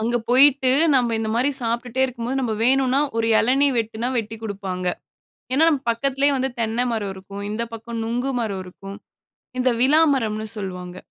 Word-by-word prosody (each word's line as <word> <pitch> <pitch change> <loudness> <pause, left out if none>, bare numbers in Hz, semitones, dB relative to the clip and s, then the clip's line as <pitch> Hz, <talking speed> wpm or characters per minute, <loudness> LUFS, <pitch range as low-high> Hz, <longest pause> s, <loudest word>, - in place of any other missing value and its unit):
அங்க 235 +2 0
போய்ட்டு, 265 +1 +5 0.2
நம்ம 240 -3 +2
இந்த 220 -1 -2
மாரி 255 +4 +2
சாப்பிட்டே 235 +2 -2
இருக்கும்போது, 255 +1 -3
நம்ம 240 -4 -1
வேணும்னா 265 +1 +3 0.2
1 225 - +1
இளநீர் 270 +2 +2
வெட்டினா 225 +2 -2
வெட்டிக் 225 0 -4
குடுப்பாங்க. 195 -3 -4 0.7
ஏன்ன, 320 +4 +4
நம்ம 290 -5 0
பக்கத்திலயே 275 +4 +1
வந்து 265 +1 -1
தென்னை 225 +2 0
மரம் 205 -3 -2
இருக்கும். 200 +1 -9
இந்த 215 +2 -2
பக்கம் 230 0 -6
நுங்கு 245 +4 -1
மரம் 200 -4 -3
இருக்கும். 195 +2 -10 0.6
இந்த 255 0 +2
விழா 285 +5 +5
மரம்ன்னு 220 -4 -2
சொல்லுவாங்க. 180 -2 -6
235 Hz, 160 wpm, -22 LUFS, 215-260 Hz, 0.7 s, போய்ட்டு